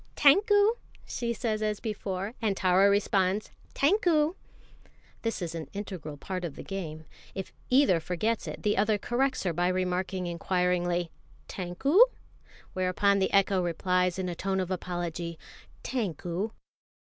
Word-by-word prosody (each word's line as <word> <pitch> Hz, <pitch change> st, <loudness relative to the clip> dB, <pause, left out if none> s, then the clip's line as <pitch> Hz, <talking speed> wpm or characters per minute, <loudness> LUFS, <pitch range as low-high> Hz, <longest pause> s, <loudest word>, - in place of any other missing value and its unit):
"Tankou!" 410 Hz, +8 st, +5 dB, 0.3 s
she 235 Hz, -1 st, -3 dB
says 220 Hz, -1 st, -2 dB
as 210 Hz, -1 st, -1 dB
before, 200 Hz, -2 st, -4 dB
and 205 Hz, -4 st, 0 dB
Tara 185 Hz, +2 st, +4 dB
responds 200 Hz, 0 st, +1 dB, 0.2 s
"Tankou!" 320 Hz, -1 st, +3 dB, 0.9 s
This 225 Hz, -5 st, -2 dB
is 165 Hz, -1 st, -4 dB
an 165 Hz, -2 st, -5 dB
integral 185 Hz, -7 st, -6 dB
part 185 Hz, +5 st, -5 dB
of 165 Hz, -5 st, -4 dB
the -, -, -8 dB
game. 160 Hz, -5 st, -6 dB, 0.3 s
If 190 Hz, -1 st, -5 dB, 0.2 s
either 255 Hz, -9 st, +5 dB
forgets 180 Hz, +7 st, -1 dB
it, -, -, -7 dB
the 210 Hz, -, +1 dB
other 210 Hz, +1 st, +3 dB
corrects 255 Hz, +5 st, 0 dB
her 180 Hz, -3 st, 0 dB
by 175 Hz, +2 st, +1 dB
remarking 185 Hz, 0 st, -1 dB
inquiringly, 175 Hz, 0 st, 0 dB, 0.4 s
"Tankou?" 190 Hz, -, 0 dB, 0.7 s
whereupon 185 Hz, +2 st, +2 dB
the 190 Hz, -, +1 dB
echo 195 Hz, -1 st, +3 dB
replies 180 Hz, +1 st, +1 dB
in 190 Hz, -1 st, -2 dB
a 175 Hz, -, -2 dB
tone 190 Hz, +2 st, -1 dB
of 185 Hz, 0 st, -2 dB
apology, 175 Hz, -2 st, -3 dB, 0.5 s
"Tankou!" 190 Hz, -, -2 dB
190 Hz, 135 wpm, -29 LUFS, 180-215 Hz, 0.9 s, Tankou